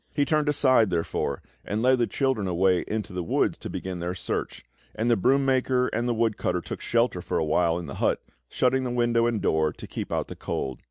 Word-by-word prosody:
He 145 - +2
turned 150 0 +1
aside, 130 -7 +4
therefore, 80 -5 -2 0.2
and 105 +3 -2
led 130 0 +4
the 120 - +2
children 130 -8 0
away 90 0 +2
into 105 -3 -3
the 90 - -2
woods 80 - +1
to - - -7
begin 95 -2 -5
their 90 +1 -3
search; 90 - -4 0.3
and 115 +2 +1
the - - +5
broom 135 +7 +2
maker 130 -1 +2
and 120 +2 -1
the 120 - +1
woodcutter 110 -5 0
took - - -7
shelter - - +1
for - - -2
awhile 80 +2 +2
in 85 - -5
the 70 - -7
hut, - - +2 0.3
shutting 130 +1 +1
the 125 - -2
window 120 -1 +2
and 115 -3 -1
door 80 -1 +2
to - - -10
keep - - -6
out - - -1
the - - -8
cold. 65 -2 -4
115 Hz, 220 wpm, -26 LUFS, 90-130 Hz, 0.3 s, the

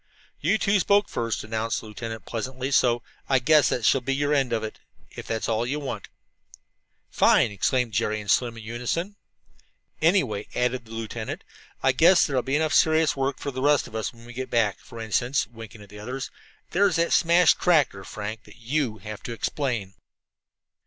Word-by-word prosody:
"You 185 +9 +2
two 200 -1 +2
spoke 200 +2 +3
first," 115 -1 -2
announced 110 +1 -2
the - - -12
lieutenant 110 +1 -7
pleasantly, 130 +3 -4
"so 120 -3 +3 0.3
I 135 - +5
guess 150 +3 +4
that 120 - -1
shall 135 - +4
be 135 +2 -1
your 145 +1 +1
end 135 -4 +1
of 115 -2 0
it, 110 - -6 0.3
if - - -9
that's 115 -1 -2
what 115 +2 0
you 150 +2 -1
want." 140 -3 -5 1.0
"Fine!" - - +4
exclaimed 120 +4 0
Jerry 110 0 0
and 105 -1 -2
Slim 120 -2 +1
in 115 - -9
unison. 125 - -3 0.9
"Anyway," 140 - +2
added 125 0 0
the 110 - -15
lieutenant, 115 0 -5 0.4
"I 135 - +5
guess 170 +8 +5
there'll 135 -4 0
be 135 +3 -1
enough 155 0 +1
serious 160 0 +4
work 135 -1 -1
for 140 - -4
the 130 0 -5
rest 145 0 +3
of - - -12
us 110 -1 -2
when 115 -1 -16
we 120 - -11
get 130 +1 -5
back. 110 -4 +1
For 115 -2 -12
instance," 120 +5 0
winking 115 -1 -12
at 100 - -16
the 105 +1 -11
others, 125 +5 -5 0.4
"there's 195 -1 +3
that 170 0 +1
smashed 170 0 +5
tractor, 145 - +2
Frank, 105 +2 -6
that - - -16
you 125 0 -1
will 110 - -15
have 110 0 -7
to 120 - -6
explain." 115 -5 -2
125 Hz, 195 wpm, -25 LUFS, 110-145 Hz, 1.0 s, I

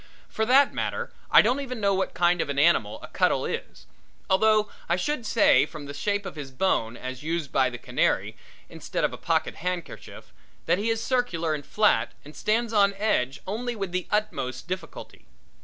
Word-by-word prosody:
For 220 0 -1
that 275 +3 +5
matter, 475 0 -3 0.2
I - - +7
don't 245 +6 +1
even 255 -4 -5
know 200 -1 +2
what 190 0 -1
kind 175 0 +3
of - - -3
an 140 - -3
animal 140 -9 +3
a - - -7
cuttle - - +1
is, - - -6 0.5
although 215 +2 +4 0.2
I 170 - +3
should 235 +5 -2
say 225 - +4
from 155 -3 -9
the 140 - -7
shape 205 +7 -1
of 190 - -7
his 145 -3 -7
bone 130 -6 0
as 130 0 -6
used 160 -2 -3
by 130 -1 +3
the 125 - -7
canary - - 0 0.3
instead - - -4
of - - +1
a - - -6
pocket - - -1
handkerchief, 180 0 -6 0.3
that 180 - +2
he 215 +3 -1
is 225 0 0
circular 180 -11 0
and 145 -1 -4
flat 210 +8 +2
and 150 - -12
stands 225 +2 0
on 200 -1 +4
edge 140 -11 0
only 240 +5 -3
with 195 -4 -4
the 180 0 -2
utmost 170 - -2
difficulty. 180 - -7
190 Hz, 190 wpm, -26 LUFS, 150-220 Hz, 0.5 s, I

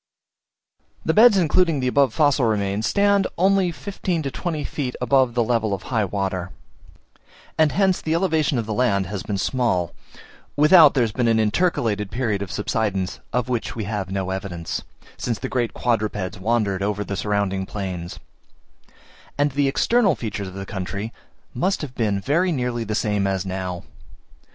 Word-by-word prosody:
The 160 - +2
beds 220 0 +7
including 170 -2 +2
the 130 - 0
above 140 +1 +3
fossil 145 -4 +3
remains, 105 -1 0
stand 200 -1 +3
only 190 0 +3
from 160 - -14
fifteen 185 -4 -2
to 135 - -3
twenty 160 -2 -3
feet 130 -4 -4
above 125 -1 +2
the 120 - +3
level 110 -3 0
of 95 - -11
high 110 -5 0
water; 95 -2 -3 1.1
and 155 -2 +3
hence 190 -2 +2
the 160 0 0
elevation 160 -6 +1
of 115 - -1
the 110 - -3
land 105 -5 +1
has 100 +1 -5
been 100 +1 -3
small 95 - 0 0.6
(without 150 0 +7
there 130 - +4
has 115 - -1
been 120 +3 0
an 115 -1 +3
intercalated 110 - +1
period 110 -5 -1
of 100 -2 -5
subsidence, 100 -3 -2
of 125 -1 0
which 125 -3 -2
we 110 - -3
have 100 -2 -3
no 95 -1 -2
evidence) 95 -3 -4 0.4
since 115 -3 -2
the - - -4
great 120 -3 -1
quadrupeds 105 -4 -1
wandered 105 -2 0
over 105 +1 -1
the 100 - -4
surrounding 100 -2 -1
plains; 90 -4 -5 1.2
and 145 0 +2
the 140 +1 +1
external 200 - +3
features 105 -3 -4
of 95 - -9
the 95 0 -5
country 100 +3 -5 0.4
must 185 +10 0
then - - -2
have 130 - -20
been 105 -4 0
very 165 - +1
nearly 125 -5 -1
the 105 -1 -3
same 105 -3 0
as 95 -1 -1
now. 95 -2 -4
115 Hz, 175 wpm, -22 LUFS, 100-145 Hz, 1.2 s, beds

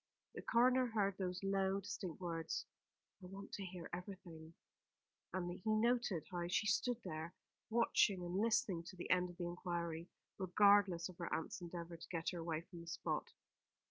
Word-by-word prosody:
The - - -5
coroner 250 +2 +4
heard 200 -4 +1
those 180 0 -2
low, 195 0 +2
distinct 195 -4 -5
words, 165 -3 -2 0.6
"I 180 - -8
want 195 +2 -8
to 200 - -3
hear 180 -2 -6
everything," 175 -3 -7 0.8
and 175 -1 -1
he 215 +4 +2
noted 235 -6 +2
how 175 -1 -1
she 180 +4 +2
stood 235 +3 +2
there, 160 +3 -5 0.3
watching 215 -5 +3
and 175 - -4
listening 215 -6 +2
to 180 - -8
the 175 - -4
end 180 0 +4
of 175 - -11
the 175 - -2
inquiry, 170 -1 -3 0.3
regardless 195 -2 +5
of 185 -2 -12
her 170 - -3
aunt's 160 - -2
endeavour 170 -1 -6
to - - -11
get 165 -2 -1
her 175 - -4
away 165 -1 -1
from 175 -1 -10
the 170 - -11
spot. 165 - -1
180 Hz, 175 wpm, -39 LUFS, 170-200 Hz, 0.8 s, regardless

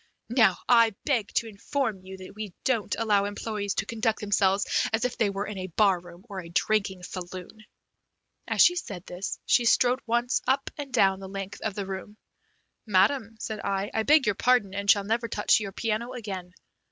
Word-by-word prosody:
Now, 220 -7 +4
I 230 -3 +5
beg 235 -8 0
to 230 - +1
inform 220 0 -3
you 190 0 -9
that 185 0 -11
we 210 -3 -7
don't 230 -6 0
allow 205 -3 +2
employees 205 0 -3
to - - -1
conduct 225 -1 -1
themselves 200 -1 +2 0.3
as 225 +2 0
if 250 - -2
they 215 - +1
were 200 +1 -3
in 210 -3 -6
a 185 - -4
bar 190 +1 +3
room 175 +2 -14
or 200 -3 -6
a 170 - -11
drinking 195 0 0
saloon." 185 +4 -8 0.8
As - - +2
she 355 - +5
said 200 - -6
this, 180 +2 -5
she 245 - +4
strode 245 +2 +4
once 240 +2 +1
up 270 +1 +1
and 285 -2 -7
down 195 -5 +3
the 190 -1 -8
length 195 0 -6
of 220 -3 -3
the 200 - -3
room. 195 +2 -7 0.7
"Madam," 220 +4 +2
said 215 -1 -4
I, 200 0 -2
"I 220 - +1
beg 295 +4 +4
your 210 - +2
pardon, 220 -3 +2
and 200 0 -3
shall 205 -1 +6
never 230 +3 -1
touch 210 -1 +2
your 200 -2 -5
piano 225 +4 -2
again. 190 -6 -6
205 Hz, 195 wpm, -27 LUFS, 195-230 Hz, 0.8 s, shall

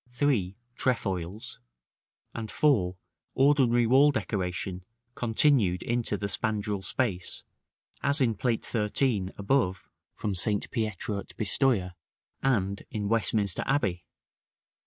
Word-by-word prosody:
3. 120 -8 0 0.2
Trefoils; 105 -2 -2 0.7
and 110 -2 -5
4, 100 -13 +2 0.4
ordinary 130 -4 +4
wall 135 +5 +6
decoration 95 -6 -3 0.3
continued 115 -6 +2
into 120 -3 0
the 100 - -4
spandril 105 -1 -2
space, 95 -3 -1 0.6
as 140 +2 +4
in 120 -4 +3
Plate 115 +2 -1
XIII., 105 -2 +1
above, 100 -3 0 0.3
from 105 - -2
St. 100 +3 -1
Pietro 110 -3 -2
at - - -11
Pistoja, 105 -3 +1 0.5
and 100 -7 0
in 105 -3 -3
Westminster 105 -4 +1
Abbey. 105 -11 0
110 Hz, 105 wpm, -28 LUFS, 95-125 Hz, 0.7 s, wall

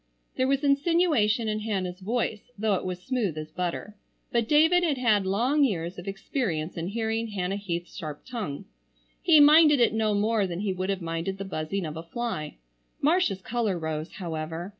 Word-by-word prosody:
There 260 - +1
was 275 +1 +1
insinuation 280 -6 +2
in 215 0 -1
Hannah's 190 -4 -3
voice 220 +2 -2
though 215 0 +1
it 185 - -1
was 180 -1 -4
smooth 220 - -1
as 155 0 -6
butter, 180 +4 -4 0.4
but 235 -2 +1
David 320 +4 +5
had 305 -5 +1
had 215 -6 +2
long 250 +10 +2
years 180 -7 -1
of 180 - -10
experience 195 - -3
in 165 0 -3
hearing 225 +2 -1
Hannah 195 -2 -2
Heath's 175 -4 -5
sharp 150 -3 -7
tongue. 215 - -5 0.6
He 320 -3 +6
minded 300 0 +7
it 235 - +4
no 220 -1 +1
more 210 0 +1
than 175 +1 -4
he 200 -2 -1
would 185 +1 -3
have 195 -3 -2
minded 165 +3 -3
the 195 - -5
buzzing 180 +1 -3
of 155 0 -5
a - - -4
fly. 170 -3 -4 0.4
Marcia's 285 - +2
color 225 -5 -1
rose, 160 0 -4
however. 165 -1 -5
205 Hz, 180 wpm, -27 LUFS, 175-240 Hz, 0.6 s, minded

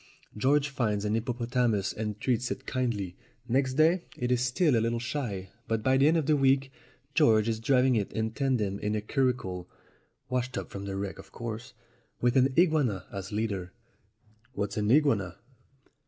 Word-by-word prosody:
George 140 +6 +2
finds 105 -6 -1
a 105 - 0
hippo 115 +3 0
potamus 120 -4 0
and 105 -1 -4
treats 125 0 0
it 130 - -5
kindly. 110 -8 -2 0.3
Next 130 +1 +1
day 165 +4 +3
it 125 0 -1
is 125 -1 +2
still 125 +4 +2
a 115 - +3
little 115 +1 0
shy; 115 -6 -4 0.2
but 115 -1 -1
by 130 0 +3
the 135 +2 +5
end 165 +2 +4
of 160 - 0
the 155 +1 +3
week 135 -1 +2 0.4
George 115 -9 +4
is 110 -1 -1
driv 125 +3 +3
ing 130 - +4
it 105 -3 0 0.2
tandem 115 -8 0
in 105 +1 -1
a 105 - -1
curricle 105 -8 -1 0.6
(washed 125 0 -2
up - - -5
from 100 0 -6
the 100 -1 -4
wreck, 95 -1 -4
of 95 0 -13
course), 120 +2 -6 0.4
with 120 +1 +2
an 135 +1 +4
iguana 150 - +3
as 100 -1 -6
leader." 100 -4 -2 0.8
"What's 100 -4 -3
an 105 0 0
iguana?" 115 - +3
120 Hz, 180 wpm, -29 LUFS, 105-130 Hz, 0.8 s, the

